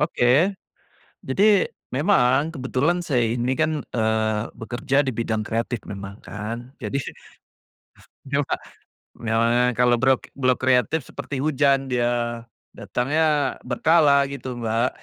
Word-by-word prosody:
Oke, 150 -4 0 1.0
jadi 130 +9 +1 0.5
memang 135 -5 +3 0.2
kebetulan 135 +6 0
saya 125 -7 +1
ini 125 +2 -1
kan, 155 -2 0
eee, 110 -1 +1 0.2
bekerja 120 +4 -2
di - - +1
bidang 110 -2 -1
kreatif 115 +1 -2
memang 100 0 -7
kan 115 +4 -6
jadi 110 +6 -2 1.3
iya, 140 +1 0
Kak, - - -2 0.7
memang 115 +1 +2
ya 125 - +4
kalau 125 -1 +4
brok 130 -1 +3 0.2
blok 130 -2 +2
kreatif 130 +4 +2
seperti 145 - -6
hujan 140 -2 +2
dia, 120 -1 -1 0.3
datangnya 150 +3 0
berkala 140 +2 +4
gitu, 130 -2 -6
Mbak, 115 +2 +1
125 Hz, 120 wpm, -23 LUFS, 115-140 Hz, 1.3 s, ya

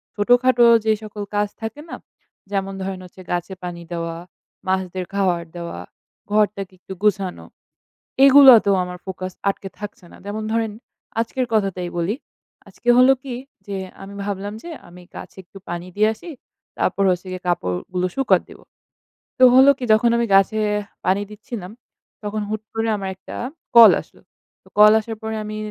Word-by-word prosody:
ছোটোখাটো 245 +3 +4 0.2
যে 220 - +3
সকল 210 -1 -6
কাজ 205 0 +2
থাকে 225 +7 -6
না? - - -5 0.6
যেমন 195 -1 -2
ধরেন 190 -1 -4
হচ্ছে 185 +1 -14
গাছে 175 +2 -2
পানি 175 -1 -6
দেওয়া, 165 -1 -4 0.5
মাছদের 185 -1 -1
খাওয়ার 180 -4 +1
দেওয়া, 170 - -6 0.5
ঘরটাকে 200 -2 0
একটু 190 - -9
গুছানো। 195 -3 0 0.8
এগুলাতেও 260 -7 +8
আমার 180 0 -8
ফোকাস 185 0 -5 0.2
আটকে 195 0 -3
থাকছে 205 -3 -8
না। - - -13
যেমন 215 +1 -4
ধরেন, 225 -2 0 0.5
আজকের 250 +2 -2
কথাটাই 190 -4 0
বলি। 190 +8 -1 0.5
আজকে 245 - -10
হল 255 - +7
কি, 260 -3 -6 0.3
যে 200 -1 -4 0.3
আমি 200 +1 -10
ভাবলাম 205 +1 -4
যে 345 - -8 0.2
আমি 180 +1 -14
গাছে - - -10
একটু 195 - -14
পানি 175 +1 -5
দিয়ে 215 +1 +4
আসি, 340 - -11 0.5
তারপর 200 - +1
হচ্ছে 180 +1 -2
গিয়ে 185 - -6
কাপড়গুলো 175 - -1
শুকাতে 270 -1 +2
দেব। - - -14 0.8
তো 255 - +5
হলো 265 +2 +8
কি? - - -8
যখন 235 +2 +4
আমি 235 - +1
গাছে, 195 +3 +3 0.5
পানি 195 +2 +2
দিচ্ছিলাম 210 -3 -8 0.5
তখন 210 +1 -3
হুট 215 0 -3
করে 225 0 -1
আমার 195 -1 -4
একটা 190 - -10 0.4
কল 230 -1 +10
আসলো। - - -22 0.4
তো - - -23
কল 210 0 +8
আসার 225 +1 -6
পরে 220 0 -4
আমি 215 0 -6
200 Hz, 160 wpm, -21 LUFS, 185-220 Hz, 0.8 s, কল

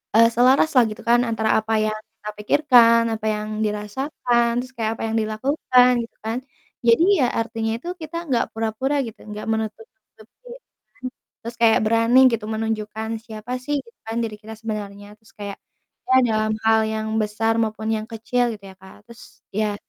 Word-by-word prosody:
eee, 230 +1 +7
selaraslah 255 +1 +5
gitu 215 - -9
kan 240 0 +6
antara 220 -1 -1
apa 220 +1 -3
yang 215 0 -1 0.2
kita 210 - -7
pikirkan, 230 -1 +5
apa 220 0 -7
yang 210 0 -2 0.2
dirasakan, 235 +3 -1
terus 255 +1 -6
kayak 220 -1 -1
apa - - -3
yang - - -1
dilakukan 250 +3 +3
gitu 230 - -13
kan? 225 +2 -1 0.5
Jadi, 230 +9 +5 0.2
ya 255 - +4
artinya 225 -1 -2
itu 300 - -11
kita 315 +2 -8
enggak 245 -4 +2
pura-pura 225 +6 -1
gitu, 225 -1 -10
enggak 210 0 -7
menutup-nutupi 220 - -7 0.5
mhm, 255 - -2 0.4
terus 235 0 -6
kayak 225 -1 +5
berani 230 +3 +4
gitu 225 -2 -2
menunjukkan 220 0 -3
siapa 225 +1 -9
sih 290 +3 -2
gitu 230 - -21
kan 225 +1 -3
diri 215 -2 -4
kita 220 +1 -9
sebenarnya. 205 -2 -6
Terus 220 - -22
kayak, 200 -1 -6 0.5
ya 260 - +5
dalam 215 0 +1
hal 220 0 +5
yang 220 0 -3
besar 215 +2 0
maupun 220 0 -3
yang 215 0 -3
kecil 230 +2 -1
gitu 200 - -18
ya, - - -17
Kak. 190 +2 -16
Terus, 235 -1 -13 0.3
ya 210 0 0
225 Hz, 170 wpm, -22 LUFS, 215-240 Hz, 0.5 s, eee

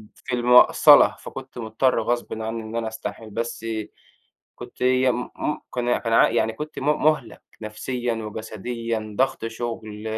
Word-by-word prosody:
في 125 - -4
المَقصَلة، 125 +1 +6
فكنت 130 -1 -10
مُضطر 115 +2 +1
غصبٍ 120 -1 -2
عنّي 110 0 -4
إن 110 +1 -8
أنا 115 -1 -1
أستحمل، 110 0 -7
بس 115 +1 -4 0.9
كنت - - -12
يم 130 -1 +2
م 150 - -2 0.2
كان 120 0 +1
كان 115 -1 -2
ع - - +6
يعني 110 -1 0
كنت 155 +1 -7
م 135 - -5 0.2
مُهلَك 150 -7 +1 0.2
نفسيًا 120 +3 -3
وجسديًا، 110 0 -5
ضَغْط 130 -3 +1
شُغل، 115 -2 -6
115 Hz, 140 wpm, -23 LUFS, 110-125 Hz, 0.9 s, المَقصَلة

